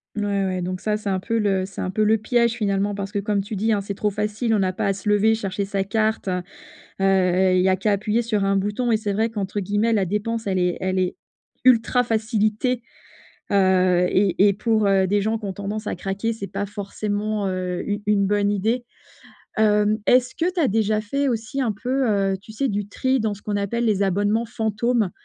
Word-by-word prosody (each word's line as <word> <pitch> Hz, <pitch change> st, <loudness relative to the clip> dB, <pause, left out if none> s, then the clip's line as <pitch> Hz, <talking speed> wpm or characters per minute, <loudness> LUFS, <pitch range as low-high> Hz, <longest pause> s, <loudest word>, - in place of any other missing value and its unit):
Mouais, 200 Hz, -2 st, 0 dB
ouais 185 Hz, -1 st, -2 dB
donc 185 Hz, +1 st, -4 dB
ça 210 Hz, -1 st, 0 dB
c'est 210 Hz, -1 st, -4 dB
un 190 Hz, -1 st, 0 dB
peu 230 Hz, +4 st, -2 dB
le 195 Hz, -3 st, +1 dB
c'est 195 Hz, -, -7 dB
un 185 Hz, -, -2 dB
peu 215 Hz, +3 st, +1 dB
le 220 Hz, +1 st, +4 dB
piège 235 Hz, +1 st, +1 dB
finalement. 205 Hz, -3 st, -1 dB
Parce 195 Hz, 0 st, -5 dB
que 205 Hz, -, -1 dB
comme 205 Hz, 0 st, 0 dB
tu 205 Hz, +2 st, -6 dB
dis, 220 Hz, +3 st, 0 dB
hein, 205 Hz, -2 st, +1 dB
c'est 200 Hz, 0 st, -5 dB
trop 210 Hz, +1 st, -1 dB
facile. 210 Hz, +3 st, -1 dB
On 200 Hz, -, +2 dB
a 185 Hz, 0 st, 0 dB
pas 185 Hz, -, -1 dB
à 195 Hz, -, +2 dB
se 195 Hz, +2 st, -9 dB
lever 210 Hz, +2 st, +4 dB
chercher 200 Hz, -2 st, -3 dB
sa 195 Hz, 0 st, -1 dB
carte, 220 Hz, +2 st, -1 dB
heu 180 Hz, -1 st, 0 dB, 0.6 s
heu, 190 Hz, -1 st, +3 dB
il 185 Hz, -, +3 dB
y 190 Hz, -, +3 dB
a 185 Hz, -, +4 dB
qu'à 195 Hz, +3 st, 0 dB
appuyer 210 Hz, +3 st, +1 dB
sur 215 Hz, -3 st, 0 dB
un 195 Hz, 0 st, +2 dB
bouton 210 Hz, +5 st, 0 dB
et 220 Hz, -, +4 dB
c'est 210 Hz, -2 st, -2 dB
vrai 220 Hz, +3 st, +1 dB
qu'entre 205 Hz, -2 st, -3 dB
guillemets 205 Hz, +4 st, +1 dB
la 200 Hz, -3 st, +2 dB
dépense 210 Hz, +4 st, -2 dB
elle 190 Hz, -1 st, 0 dB
est 180 Hz, -1 st, +1 dB
elle 185 Hz, 0 st, -1 dB
est 185 Hz, -1 st, 0 dB, 0.5 s
«ultra 245 Hz, 0 st, +4 dB
facilitée», 220 Hz, +1 st, 0 dB, 0.7 s
heu 185 Hz, -2 st, +3 dB
et 195 Hz, +1 st, +3 dB
et -, -, +3 dB
pour, 215 Hz, +1 st, +1 dB
heu, 195 Hz, -1 st, +3 dB
des 205 Hz, +2 st, +1 dB
gens 220 Hz, +3 st, 0 dB
qui 215 Hz, -, -7 dB
ont 195 Hz, -, -3 dB
tendance 205 Hz, +3 st, -5 dB
à -, -, -2 dB
craquer, 195 Hz, +5 st, -2 dB
c'est 220 Hz, -3 st, -6 dB
pas 200 Hz, +1 st, -4 dB
forcément, 205 Hz, +1 st, -3 dB
heu, 185 Hz, -1 st, -3 dB
une 205 Hz, +1 st, -2 dB
une 205 Hz, -1 st, +3 dB
bonne 205 Hz, 0 st, +1 dB
idée, 220 Hz, +5 st, 0 dB, 0.7 s
hem, 210 Hz, 0 st, +3 dB
est-ce 250 Hz, 0 st, +3 dB
que 340 Hz, +2 st, +1 dB
tu 360 Hz, -, -2 dB
as 290 Hz, -, +3 dB
déjà 215 Hz, 0 st, +1 dB
fait 275 Hz, +7 st, -1 dB
aussi 240 Hz, +3 st, -2 dB
un 235 Hz, -4 st, +1 dB
peu, 255 Hz, +4 st, -1 dB
heu, 195 Hz, -2 st, +1 dB
tu 220 Hz, -, -13 dB
sais 265 Hz, +5 st, -1 dB
du 205 Hz, -2 st, -2 dB
tri 260 Hz, +5 st, 0 dB
dans 215 Hz, -1 st, -1 dB
ce 205 Hz, -, -16 dB
qu'on 205 Hz, -1 st, -2 dB
appelle 205 Hz, +4 st, -1 dB
les 210 Hz, -3 st, +2 dB
«abonnements 205 Hz, +4 st, +1 dB
fantômes»? 225 Hz, -2 st, 0 dB
205 Hz, 230 wpm, -23 LUFS, 195-220 Hz, 0.7 s, le